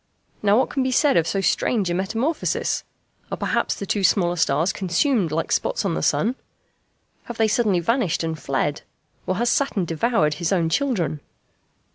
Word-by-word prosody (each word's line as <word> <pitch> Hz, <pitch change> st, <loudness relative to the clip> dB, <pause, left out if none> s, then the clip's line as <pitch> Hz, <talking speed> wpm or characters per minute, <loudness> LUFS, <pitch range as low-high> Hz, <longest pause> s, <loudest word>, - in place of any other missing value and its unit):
Now 205 Hz, 0 st, +4 dB
what 260 Hz, -, +1 dB
can 275 Hz, -, -1 dB
be 260 Hz, -, 0 dB
said 275 Hz, +3 st, +3 dB
of 165 Hz, -1 st, +3 dB
so 195 Hz, -, 0 dB
strange 200 Hz, +1 st, +1 dB
a -, -, 0 dB
metamorphosis? 225 Hz, -, -1 dB, 0.5 s
Are -, -, -2 dB
perhaps -, -, 0 dB
the 200 Hz, -, -6 dB
two 200 Hz, +1 st, -1 dB
smaller 175 Hz, -1 st, +3 dB
stars 165 Hz, +2 st, +1 dB
consumed 190 Hz, -, +1 dB
like 165 Hz, +1 st, -2 dB
spots -, -, 0 dB
on 190 Hz, -, 0 dB
the -, -, -2 dB
sun? 205 Hz, -, +1 dB, 0.9 s
Have 240 Hz, -, -7 dB
they 225 Hz, -, +3 dB
suddenly 210 Hz, -4 st, +2 dB
vanished 225 Hz, -, 0 dB
and 160 Hz, -1 st, -3 dB
fled? 145 Hz, +2 st, -1 dB, 0.5 s
Or 185 Hz, -, 0 dB
has 240 Hz, +4 st, +1 dB
Saturn 215 Hz, -10 st, 0 dB
devoured 165 Hz, -1 st, +1 dB
his 165 Hz, +4 st, -2 dB
own 170 Hz, -4 st, +1 dB
children? 180 Hz, -, 0 dB
195 Hz, 175 wpm, -22 LUFS, 165-235 Hz, 0.9 s, Now